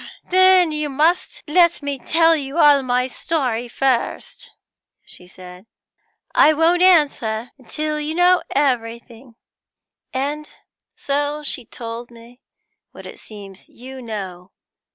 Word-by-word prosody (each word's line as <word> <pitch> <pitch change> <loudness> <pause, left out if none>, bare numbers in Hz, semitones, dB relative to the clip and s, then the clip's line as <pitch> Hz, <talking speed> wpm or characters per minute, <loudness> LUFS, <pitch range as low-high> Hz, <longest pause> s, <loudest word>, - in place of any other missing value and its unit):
'Then 370 -2 +5
you 300 -1 -3
must 315 +6 0
let 340 0 +3
me 285 -1 -4
tell 330 +5 +3
you 280 0 -5
all 290 -3 +5
my 250 -1 0
story 250 -4 -3
first,' 255 0 -2 0.6
she 180 - -10
said. 180 +2 -14 0.7
'I 310 - +5
won't 330 +3 +2
answer 280 -11 +2 0.2
till 305 0 -3
you 300 +1 -4
know 355 0 +4
everything.' 235 -2 -3 0.8
And 290 +3 -4 0.5
so 290 +1 -3
she 260 -4 -2
told 230 +1 -8
me 235 +1 -17 0.5
what - - -13
it - - -11
seems 200 -3 -13
you 260 +2 -11
know. 190 -6 -7
270 Hz, 120 wpm, -20 LUFS, 235-310 Hz, 0.8 s, Then